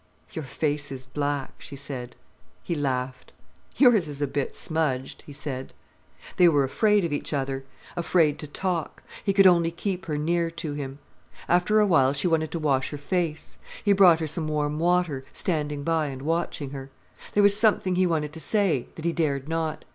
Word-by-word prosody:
"Your 160 Hz, -6 st, -5 dB
face 145 Hz, +2 st, -1 dB
is 130 Hz, -1 st, -6 dB
black," 145 Hz, +1 st, -2 dB
she 140 Hz, -, -8 dB
said. 130 Hz, -3 st, -7 dB, 0.5 s
He -, -, -2 dB
laughed. 130 Hz, -4 st, -3 dB, 0.4 s
"Yours 235 Hz, -, +5 dB
is 145 Hz, -1 st, -6 dB
a 145 Hz, -, +1 dB
bit 140 Hz, 0 st, -3 dB
smudged," 145 Hz, -5 st, -2 dB
he -, -, -9 dB
said. 135 Hz, -2 st, -6 dB, 0.6 s
They 175 Hz, -1 st, +7 dB
were 145 Hz, -3 st, +3 dB
afraid 205 Hz, +8 st, +2 dB
of 160 Hz, -, -2 dB
each 145 Hz, -, -3 dB
other, 135 Hz, -1 st, -2 dB, 0.3 s
afraid 165 Hz, -3 st, +2 dB
to 150 Hz, -, -6 dB
talk. 170 Hz, +2 st, -3 dB, 0.2 s
He 200 Hz, -, +2 dB
could 195 Hz, 0 st, +5 dB
only 170 Hz, -2 st, +5 dB
keep 185 Hz, +2 st, -4 dB
her 150 Hz, -2 st, -1 dB
near 170 Hz, +2 st, 0 dB
to 165 Hz, -2 st, -5 dB
him. 140 Hz, -2 st, -5 dB, 0.5 s
After 180 Hz, +5 st, +3 dB
a 210 Hz, -, +5 dB
while 140 Hz, -8 st, +4 dB
she 140 Hz, +5 st, 0 dB
wanted 160 Hz, -2 st, +1 dB
to -, -, -3 dB
wash 140 Hz, -4 st, +1 dB
her 145 Hz, -, -6 dB
face. 160 Hz, +1 st, -3 dB, 0.3 s
He 205 Hz, -, +5 dB
brought 180 Hz, -4 st, +6 dB
her -, -, 0 dB
some 155 Hz, +1 st, -2 dB
warm 150 Hz, 0 st, -1 dB
water, 175 Hz, -5 st, +1 dB
standing 150 Hz, -4 st, -1 dB
by 160 Hz, -1 st, +1 dB
and 135 Hz, -1 st, -7 dB
watching 160 Hz, -3 st, -2 dB
her. 135 Hz, -1 st, -7 dB, 0.5 s
There 205 Hz, -, +5 dB
was 200 Hz, 0 st, +6 dB
something 210 Hz, -3 st, +3 dB
he 185 Hz, 0 st, +3 dB
wanted 155 Hz, -3 st, -1 dB
to 160 Hz, -, -8 dB
say, 190 Hz, -, +1 dB
that 160 Hz, -, -8 dB
he 170 Hz, -, +1 dB
dared 145 Hz, -5 st, -1 dB
not. 160 Hz, -1 st, -2 dB
155 Hz, 190 wpm, -26 LUFS, 140-175 Hz, 0.6 s, They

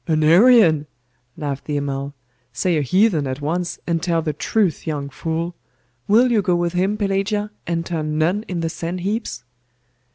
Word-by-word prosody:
'An 155 Hz, -2 st, +2 dB
Arian?' 170 Hz, -, +6 dB, 0.5 s
laughed 145 Hz, -4 st, -4 dB
the 150 Hz, -1 st, -2 dB
Amal. 140 Hz, 0 st, -3 dB, 0.4 s
'Say 180 Hz, -3 st, 0 dB
a 150 Hz, -, +1 dB
heathen 170 Hz, -, +2 dB
at 130 Hz, +1 st, -4 dB
once, 170 Hz, +4 st, -2 dB
and 165 Hz, -1 st, 0 dB
tell 170 Hz, -2 st, 0 dB
the 155 Hz, -2 st, -1 dB
truth, 180 Hz, +2 st, 0 dB
young 145 Hz, -3 st, -3 dB
fool! 165 Hz, +4 st, -3 dB, 0.5 s
Will 240 Hz, +5 st, +4 dB
you 220 Hz, -3 st, +3 dB
go 185 Hz, -3 st, +1 dB
with 175 Hz, 0 st, -1 dB
him, 190 Hz, +4 st, 0 dB
Pelagia, 205 Hz, +1 st, -1 dB, 0.2 s
and 165 Hz, 0 st, -1 dB
turn 155 Hz, -3 st, -2 dB
nun 175 Hz, +7 st, +1 dB
in 175 Hz, -2 st, -3 dB
the 165 Hz, -, -1 dB
sand 170 Hz, +2 st, -4 dB
heaps? 195 Hz, -, -3 dB
170 Hz, 170 wpm, -21 LUFS, 155-195 Hz, 0.5 s, Arian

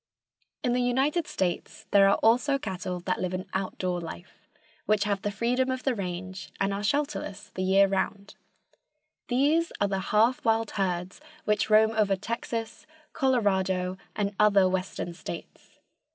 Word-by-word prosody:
In 245 Hz, -2 st, +1 dB
the 250 Hz, -, +1 dB
United 270 Hz, +7 st, +1 dB
States 180 Hz, -2 st, -3 dB
there 195 Hz, -1 st, +6 dB
are 200 Hz, -, +4 dB
also 250 Hz, +5 st, +4 dB
cattle 185 Hz, -6 st, -4 dB
that 185 Hz, +1 st, -2 dB
live 185 Hz, 0 st, -1 dB
an 185 Hz, +1 st, -4 dB
outdoor 185 Hz, -2 st, -2 dB
life, 85 Hz, -, -10 dB, 0.4 s
which 210 Hz, 0 st, +3 dB
have 200 Hz, -2 st, -1 dB
the 205 Hz, -, -1 dB
freedom 240 Hz, +5 st, 0 dB
of 260 Hz, 0 st, -2 dB
the 265 Hz, -, +1 dB
range, 185 Hz, -2 st, -5 dB
and 195 Hz, 0 st, +1 dB
are 200 Hz, -, -3 dB
shelterless 205 Hz, -5 st, -2 dB
the 185 Hz, -, -4 dB
year 195 Hz, +1 st, +5 dB
around. 195 Hz, +1 st, -2 dB, 0.9 s
These 295 Hz, +7 st, +2 dB
are 205 Hz, -, +3 dB
the 195 Hz, -1 st, -1 dB
half 225 Hz, +4 st, +3 dB
wild 225 Hz, -1 st, +1 dB
herds 185 Hz, +1 st, -2 dB, 0.2 s
which 210 Hz, -1 st, +1 dB
roam 220 Hz, +1 st, +6 dB
over 210 Hz, -3 st, +2 dB
Texas, 225 Hz, +4 st, -5 dB, 0.3 s
Colorado 190 Hz, -, +1 dB, 0.2 s
and 205 Hz, -1 st, -1 dB
other 200 Hz, -3 st, +5 dB
western 185 Hz, -1 st, -3 dB
states. 170 Hz, -, -9 dB
200 Hz, 150 wpm, -27 LUFS, 190-235 Hz, 0.9 s, there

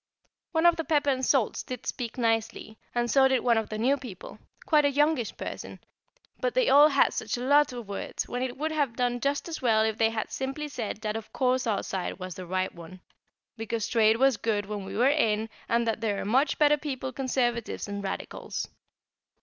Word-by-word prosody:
One 325 Hz, -1 st, +1 dB
of 345 Hz, -1 st, +6 dB
the 325 Hz, -, -1 dB
pepper 295 Hz, -3 st, +2 dB
and 260 Hz, -1 st, -2 dB
salts 260 Hz, -4 st, +2 dB
did 250 Hz, -2 st, -7 dB
speak 235 Hz, -1 st, -4 dB
nicely, 225 Hz, -2 st, -1 dB, 0.2 s
and 240 Hz, 0 st, +1 dB
so 265 Hz, +2 st, +5 dB
did 260 Hz, -2 st, +2 dB
one 235 Hz, -2 st, +3 dB
of 220 Hz, -, -5 dB
the 215 Hz, -, -4 dB
new 260 Hz, +6 st, +2 dB
people 235 Hz, -10 st, -10 dB, 0.3 s
quite 305 Hz, -2 st, +4 dB
a 285 Hz, -, +4 dB
youngish 290 Hz, -4 st, +1 dB
person; -, -, -7 dB, 0.6 s
but -, -, -1 dB
they -, -, +3 dB
all 290 Hz, +2 st, +8 dB
had 280 Hz, -2 st, +3 dB
such 220 Hz, +2 st, -2 dB
a -, -, -5 dB
lot 290 Hz, +2 st, +4 dB
of 240 Hz, -4 st, -7 dB
words, 200 Hz, -, -4 dB
when 245 Hz, -, -3 dB
it 255 Hz, -1 st, -3 dB
would 310 Hz, +3 st, -2 dB
have 285 Hz, -7 st, 0 dB
done 245 Hz, 0 st, 0 dB
just 280 Hz, +5 st, -1 dB
as 330 Hz, -, -5 dB
well 220 Hz, -3 st, +3 dB
if 220 Hz, 0 st, -1 dB
they 225 Hz, -1 st, +4 dB
had 225 Hz, -1 st, -4 dB
simply 270 Hz, +3 st, -4 dB
said 225 Hz, -5 st, -5 dB
that 215 Hz, -1 st, -2 dB
of 225 Hz, -1 st, -6 dB
course 255 Hz, -1 st, +1 dB
our 205 Hz, -3 st, 0 dB
side 190 Hz, -2 st, -4 dB
was 185 Hz, -1 st, -6 dB
the 180 Hz, +1 st, -8 dB
right 185 Hz, +1 st, -1 dB
one 175 Hz, +2 st, -12 dB, 0.6 s
because 225 Hz, 0 st, -3 dB
trade 225 Hz, -1 st, +4 dB
was 265 Hz, -2 st, +3 dB
good 210 Hz, -3 st, -1 dB
when 205 Hz, -1 st, -5 dB
we 195 Hz, +1 st, -6 dB
were 245 Hz, +3 st, +4 dB
in, 225 Hz, -7 st, +2 dB, 0.2 s
and 235 Hz, 0 st, +2 dB
that 225 Hz, 0 st, -1 dB
there 205 Hz, -3 st, -1 dB
are -, -, -4 dB
much 260 Hz, +8 st, +2 dB
better 295 Hz, 0 st, +4 dB
people 265 Hz, -3 st, -5 dB
Conservatives 240 Hz, -3 st, -1 dB
than 200 Hz, 0 st, -5 dB
Radicals. 195 Hz, -1 st, -5 dB
240 Hz, 215 wpm, -27 LUFS, 220-275 Hz, 0.6 s, all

